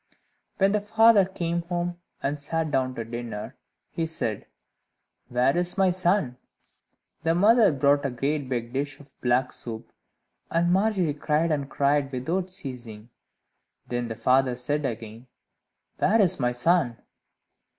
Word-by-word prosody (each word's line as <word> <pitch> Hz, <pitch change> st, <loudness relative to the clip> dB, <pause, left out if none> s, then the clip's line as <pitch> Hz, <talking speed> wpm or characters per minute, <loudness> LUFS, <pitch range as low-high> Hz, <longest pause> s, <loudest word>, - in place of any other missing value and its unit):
When 195 Hz, 0 st, +3 dB
the 210 Hz, 0 st, +1 dB
father 220 Hz, -1 st, +5 dB
came 170 Hz, -2 st, -2 dB
home, 175 Hz, 0 st, -3 dB, 0.2 s
and 145 Hz, +1 st, -2 dB
sat 160 Hz, +1 st, -2 dB
down 130 Hz, -2 st, 0 dB
to 115 Hz, -, -4 dB
dinner, 115 Hz, -2 st, -6 dB, 0.4 s
he 165 Hz, -1 st, -2 dB
said, 115 Hz, -10 st, -3 dB, 0.8 s
"Where 125 Hz, +2 st, +2 dB
is 175 Hz, +1 st, 0 dB
my 190 Hz, -1 st, +4 dB
son?" 175 Hz, -8 st, +1 dB, 0.8 s
The 165 Hz, +1 st, +1 dB
mother 215 Hz, +3 st, +5 dB
brought 140 Hz, 0 st, +2 dB
a 140 Hz, -, 0 dB
great 135 Hz, +3 st, -2 dB
big 120 Hz, -1 st, -3 dB
dish 140 Hz, +1 st, -3 dB
of 145 Hz, -2 st, -17 dB
black 125 Hz, +1 st, +1 dB
soup, 110 Hz, -2 st, -7 dB, 0.6 s
and 170 Hz, +1 st, +2 dB
Margery 190 Hz, -5 st, +2 dB
cried 150 Hz, +3 st, 0 dB
and 140 Hz, -2 st, -1 dB
cried 140 Hz, 0 st, +1 dB
without 165 Hz, +9 st, -2 dB
ceasing. 120 Hz, -, -8 dB, 0.7 s
Then 120 Hz, -1 st, -3 dB
the 110 Hz, -, -5 dB
father 130 Hz, +1 st, +2 dB
said 145 Hz, +4 st, -1 dB
again, 115 Hz, +1 st, -7 dB, 0.7 s
"Where 220 Hz, +4 st, +3 dB
is 190 Hz, -7 st, +3 dB
my 125 Hz, -1 st, +1 dB
son?" 130 Hz, -2 st, +2 dB
145 Hz, 140 wpm, -26 LUFS, 125-175 Hz, 0.8 s, father